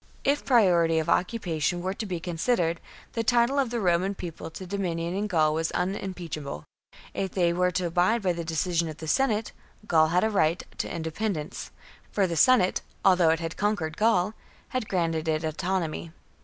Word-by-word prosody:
If 285 Hz, +1 st, +1 dB
priority 175 Hz, -10 st, +4 dB
of 160 Hz, +1 st, 0 dB
occupation 175 Hz, -5 st, 0 dB
were 190 Hz, +1 st, -1 dB
to 215 Hz, +1 st, -5 dB
be 180 Hz, -3 st, -3 dB
considered, 170 Hz, 0 st, 0 dB, 0.3 s
the 230 Hz, -, -1 dB
title 240 Hz, +4 st, +3 dB
of 265 Hz, -4 st, +1 dB
the 235 Hz, 0 st, -2 dB
Roman 185 Hz, 0 st, +1 dB
People 170 Hz, -3 st, -7 dB
to 185 Hz, +3 st, -8 dB
dominion 175 Hz, -3 st, -2 dB
in 205 Hz, +2 st, -1 dB
Gaul 155 Hz, -5 st, +2 dB
was 160 Hz, +1 st, 0 dB
unimpeachable; 175 Hz, -, -4 dB, 0.5 s
if 190 Hz, -2 st, -3 dB
they 175 Hz, -2 st, +2 dB
were 180 Hz, +1 st, +2 dB
to 180 Hz, 0 st, -1 dB
abide 180 Hz, +7 st, +2 dB
by 180 Hz, -2 st, +2 dB
the 170 Hz, 0 st, -4 dB
decision 165 Hz, +1 st, 0 dB
of 155 Hz, -, -8 dB
the 160 Hz, -, -7 dB
Senate, 225 Hz, -, +1 dB, 0.3 s
Gaul 160 Hz, -5 st, +4 dB
had 175 Hz, +3 st, +2 dB
a 220 Hz, -, +1 dB
right 170 Hz, -4 st, +2 dB, 0.2 s
to -, -, -2 dB
independence, 165 Hz, 0 st, -3 dB, 0.4 s
for 200 Hz, -, +2 dB
the 170 Hz, -2 st, -2 dB
Senate, 215 Hz, 0 st, +4 dB, 0.2 s
although 180 Hz, -4 st, +5 dB
it 160 Hz, +1 st, +1 dB
had 165 Hz, 0 st, -4 dB
conquered 200 Hz, -7 st, -1 dB
Gaul, 210 Hz, -2 st, +2 dB, 0.4 s
had 255 Hz, -4 st, -3 dB
granted 165 Hz, -3 st, 0 dB
it 155 Hz, 0 st, 0 dB
autonomy. 165 Hz, 0 st, -2 dB
175 Hz, 180 wpm, -27 LUFS, 165-200 Hz, 0.5 s, although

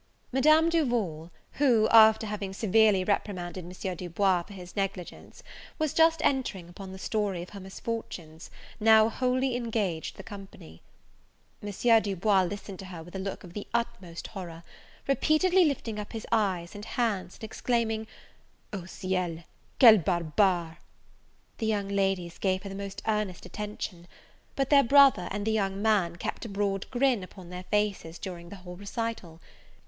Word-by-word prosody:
Madame 310 Hz, +5 st, +5 dB
Duval, 235 Hz, -, 0 dB, 0.2 s
who, 240 Hz, -6 st, +3 dB
after 220 Hz, 0 st, +7 dB
having 205 Hz, -2 st, -4 dB
severely 215 Hz, -1 st, +3 dB
reprimanded 185 Hz, -3 st, -2 dB
M. 180 Hz, +1 st, -5 dB
Du 175 Hz, +1 st, -7 dB
Bois 185 Hz, +1 st, +2 dB
for 200 Hz, +4 st, -12 dB
his 180 Hz, -2 st, -11 dB
negligence, 195 Hz, -3 st, -5 dB, 0.3 s
was 310 Hz, -2 st, -1 dB
just 325 Hz, 0 st, +4 dB
entering 230 Hz, -10 st, 0 dB
upon 185 Hz, +2 st, -10 dB
the 190 Hz, -, -8 dB
story 195 Hz, -3 st, -2 dB
of 180 Hz, -, -12 dB
her 200 Hz, -, -8 dB
misfortunes, 190 Hz, -5 st, -6 dB, 0.3 s
now 220 Hz, 0 st, +6 dB
wholly 255 Hz, +2 st, 0 dB
engaged 215 Hz, -9 st, -2 dB
the 195 Hz, -, -8 dB
company. 195 Hz, -, -11 dB, 0.8 s
M. 220 Hz, +3 st, +3 dB
Du 200 Hz, -2 st, -3 dB
Bois 195 Hz, +1 st, +3 dB
listened 195 Hz, 0 st, -7 dB
to 195 Hz, -, -7 dB
her 175 Hz, -3 st, -8 dB
with 175 Hz, +3 st, -13 dB
a -, -, -3 dB
look 195 Hz, +1 st, -5 dB
of 175 Hz, -2 st, -12 dB
the 205 Hz, -, -6 dB
utmost 235 Hz, -8 st, -3 dB
horror, 170 Hz, -4 st, -8 dB, 0.4 s
repeatedly 335 Hz, +6 st, +3 dB
lifting 235 Hz, -7 st, -2 dB
up 210 Hz, -, -7 dB
his 225 Hz, -1 st, -5 dB
eyes 190 Hz, -6 st, 0 dB
and 205 Hz, -, -8 dB
hands, 210 Hz, -6 st, -2 dB
and -, -, -15 dB
exclaiming, 220 Hz, -1 st, -1 dB, 0.7 s
"O 190 Hz, -4 st, -5 dB
ciel! 180 Hz, -3 st, -3 dB, 0.4 s
quel 225 Hz, -5 st, +9 dB
barbare!" 170 Hz, 0 st, +1 dB, 0.8 s
The 220 Hz, -, -1 dB
young 205 Hz, -2 st, 0 dB
ladies 195 Hz, -3 st, -1 dB
gave 190 Hz, 0 st, 0 dB
her 200 Hz, -, -6 dB
the -, -, -7 dB
most 195 Hz, 0 st, -6 dB
earnest 210 Hz, -4 st, -1 dB
attention; 205 Hz, -4 st, -6 dB, 0.5 s
but 275 Hz, 0 st, -1 dB
their 285 Hz, -1 st, +8 dB
brother, 270 Hz, -8 st, +6 dB
and 205 Hz, 0 st, -3 dB
the 220 Hz, -, +1 dB
young 195 Hz, -3 st, 0 dB
man, 200 Hz, -5 st, +2 dB
kept -, -, -5 dB
a 230 Hz, -, -6 dB
broad 195 Hz, -1 st, -2 dB
grin 255 Hz, -3 st, +2 dB
upon 185 Hz, -1 st, -11 dB
their 180 Hz, 0 st, -7 dB
faces 200 Hz, -6 st, -1 dB
during 175 Hz, -3 st, -7 dB
the 200 Hz, -, -8 dB
whole 180 Hz, -2 st, -10 dB
recital. 200 Hz, -5 st, -5 dB
200 Hz, 160 wpm, -28 LUFS, 180-225 Hz, 0.8 s, quel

